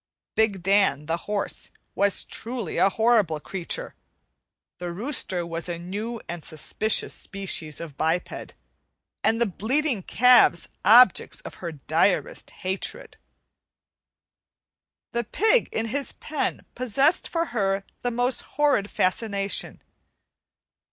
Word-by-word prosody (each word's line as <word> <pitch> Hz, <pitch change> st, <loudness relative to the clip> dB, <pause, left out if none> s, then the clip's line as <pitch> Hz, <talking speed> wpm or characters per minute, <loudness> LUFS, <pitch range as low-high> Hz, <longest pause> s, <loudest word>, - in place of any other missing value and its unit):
Big 205 Hz, -5 st, +1 dB
Dan, 195 Hz, -7 st, +2 dB
the 165 Hz, +2 st, 0 dB
horse, 205 Hz, -1 st, -2 dB, 0.2 s
was 200 Hz, 0 st, +2 dB
truly 235 Hz, -6 st, -4 dB
a 195 Hz, -, +5 dB
horrible 215 Hz, -8 st, +2 dB
creature; 190 Hz, -, -4 dB, 0.9 s
the 175 Hz, -1 st, -4 dB
rooster 190 Hz, -, -2 dB
was 165 Hz, +1 st, -5 dB
a 170 Hz, -, -3 dB
new 210 Hz, +7 st, -5 dB
and 170 Hz, -2 st, -6 dB
suspicious 175 Hz, +7 st, +1 dB
species 180 Hz, -6 st, -2 dB
of 155 Hz, -4 st, -8 dB
biped, 165 Hz, +3 st, -2 dB, 0.7 s
and 225 Hz, -, +2 dB
the 235 Hz, -, +4 dB
bleating 240 Hz, -, 0 dB
calves 250 Hz, -3 st, +5 dB, 0.2 s
objects 230 Hz, -1 st, +6 dB
of -, -, -9 dB
her 170 Hz, -2 st, -4 dB
direst 160 Hz, +6 st, 0 dB, 0.2 s
hatred. 200 Hz, -, -3 dB, 1.9 s
The 235 Hz, 0 st, -1 dB
pig 445 Hz, -, +2 dB
in 225 Hz, 0 st, -2 dB
his 280 Hz, +4 st, -2 dB
pen 310 Hz, -2 st, -3 dB
possessed 270 Hz, -, +1 dB
for 335 Hz, 0 st, -1 dB
her 195 Hz, -3 st, 0 dB, 0.2 s
the 245 Hz, -, 0 dB
most 245 Hz, +1 st, 0 dB, 0.2 s
horrid 280 Hz, -9 st, +2 dB
fascination. 200 Hz, +1 st, -1 dB
205 Hz, 115 wpm, -25 LUFS, 175-245 Hz, 1.9 s, objects